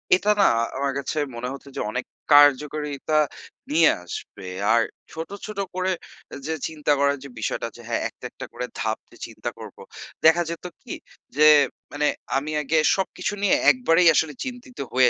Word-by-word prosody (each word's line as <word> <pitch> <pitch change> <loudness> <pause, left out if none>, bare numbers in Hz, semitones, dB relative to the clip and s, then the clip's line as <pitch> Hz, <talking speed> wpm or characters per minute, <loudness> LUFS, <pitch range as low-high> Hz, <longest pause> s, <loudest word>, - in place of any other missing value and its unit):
এটা 205 +3 +2
না - - +6 0.3
আমার 140 0 0
কাছে 140 - -4 0.2
মনে 120 +1 -4
হচ্ছে 140 0 -11
যে - - -1
অনেক 125 +2 -3 0.3
কার্যকারিতা 145 +1 +4 0.5
নিয়ে 160 +1 +6
আসবে। 90 +2 -8 0.3
আর 115 - +5 0.3
ছোট, 160 +1 -6 0.2
ছোট 210 -2 -6 0.2
করে 185 0 0 0.6
যে 160 - -1
চিন্তা 150 -2 -2
করার 140 0 +2
যে 140 - -9
বিষয়টা 110 - -2
যে 120 - -12
হ্যাঁ, 115 - 0
একটা, - - -14
একটা - - -8
করে - - -4
ধাপ - - -1
যে - - -16
চিন্তা - - -5
করব। - - -10 0.5
দেখা 165 +2 +6
যেত 170 +1 -6 0.2
কি - - -7 0.4
যে 150 0 +7 0.4
মানে 150 0 0 0.3
আমি 150 +3 -3
আগে 150 +3 0 0.2
সবকিছু 190 +1 -2
নিয়ে 200 - +4 0.2
একবারেই 180 -9 +3
আসলে 155 -1 +2
চিন্তিত 250 0 -8 0.2
হয়ে 130 -1 +6
150 Hz, 165 wpm, -24 LUFS, 140-175 Hz, 0.6 s, যে